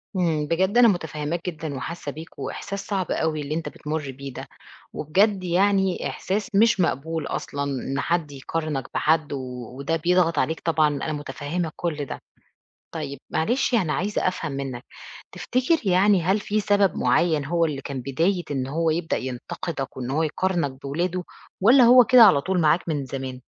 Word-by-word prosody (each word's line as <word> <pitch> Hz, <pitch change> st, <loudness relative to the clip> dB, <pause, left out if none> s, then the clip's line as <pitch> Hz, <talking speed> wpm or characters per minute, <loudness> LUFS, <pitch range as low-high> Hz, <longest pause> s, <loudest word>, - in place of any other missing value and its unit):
إمم، 160 Hz, -5 st, 0 dB
بجد 190 Hz, +8 st, +1 dB
أنا 245 Hz, -1 st, +8 dB
متفهّماك 160 Hz, -3 st, -2 dB
جدًا 155 Hz, -3 st, -6 dB
وحاسّة 145 Hz, +2 st, -5 dB
بيك 160 Hz, +3 st, -11 dB
وإحساس 200 Hz, 0 st, -5 dB
صعب 190 Hz, -4 st, -2 dB
أوي 155 Hz, -1 st, 0 dB
اللي 150 Hz, +2 st, -3 dB
أنت 165 Hz, -, -3 dB
بتمر 150 Hz, -2 st, -4 dB
بيه 135 Hz, 0 st, -8 dB
ده، -, -, -8 dB, 0.5 s
وبجد 190 Hz, +5 st, +1 dB
يعني 190 Hz, +1 st, +1 dB
إحساس 200 Hz, +2 st, -2 dB
مش 225 Hz, 0 st, +4 dB
مقبول 160 Hz, -1 st, -1 dB
أصلًا 140 Hz, 0 st, -3 dB
إن 135 Hz, 0 st, -3 dB
حد 165 Hz, -2 st, -1 dB
يقارنك 145 Hz, 0 st, -3 dB
بحد، 155 Hz, -2 st, +1 dB
وده 130 Hz, +3 st, -4 dB
بيضغط 170 Hz, -1 st, +2 dB
عليك 160 Hz, +1 st, 0 dB
طبعًا 155 Hz, -2 st, +2 dB
أنا 145 Hz, +2 st, -2 dB
متفهمة 145 Hz, +3 st, -4 dB
كلّ 155 Hz, -4 st, -3 dB
ده، -, -, -7 dB, 0.7 s
طيب 140 Hz, -4 st, -5 dB
معلش 240 Hz, +9 st, +1 dB
أنا 180 Hz, -9 st, +2 dB
عايزة 200 Hz, +3 st, 0 dB
أفهم 165 Hz, -5 st, -4 dB
منك، 135 Hz, -3 st, -5 dB, 0.5 s
تفتكر 255 Hz, +6 st, +1 dB
يعني 190 Hz, 0 st, +4 dB
هل 190 Hz, +5 st, +2 dB
في 210 Hz, +1 st, -1 dB
سبب 200 Hz, -2 st, +2 dB
معيّن 160 Hz, -4 st, +2 dB
هو 170 Hz, +3 st, +1 dB
اللي 145 Hz, -4 st, -2 dB
كان 135 Hz, -1 st, -5 dB
بداية 165 Hz, +9 st, 0 dB
إن 135 Hz, -3 st, -1 dB
هو 160 Hz, +4 st, 0 dB
يبدأ 165 Hz, +1 st, -1 dB
ينتقدك 130 Hz, +3 st, -5 dB
وإن 125 Hz, -1 st, -4 dB
هو 150 Hz, +4 st, +1 dB
يقارنك 170 Hz, -1 st, 0 dB
بولاده، 175 Hz, +6 st, -2 dB, 0.4 s
والّا 240 Hz, +6 st, +7 dB
هو 250 Hz, +1 st, +8 dB
كده 250 Hz, 0 st, +7 dB
على 185 Hz, -10 st, +7 dB
طول 185 Hz, +3 st, 0 dB
معاك 165 Hz, +2 st, +2 dB
من 145 Hz, -4 st, -1 dB
زمان؟ 130 Hz, -1 st, -6 dB
160 Hz, 165 wpm, -24 LUFS, 140-185 Hz, 0.7 s, أنا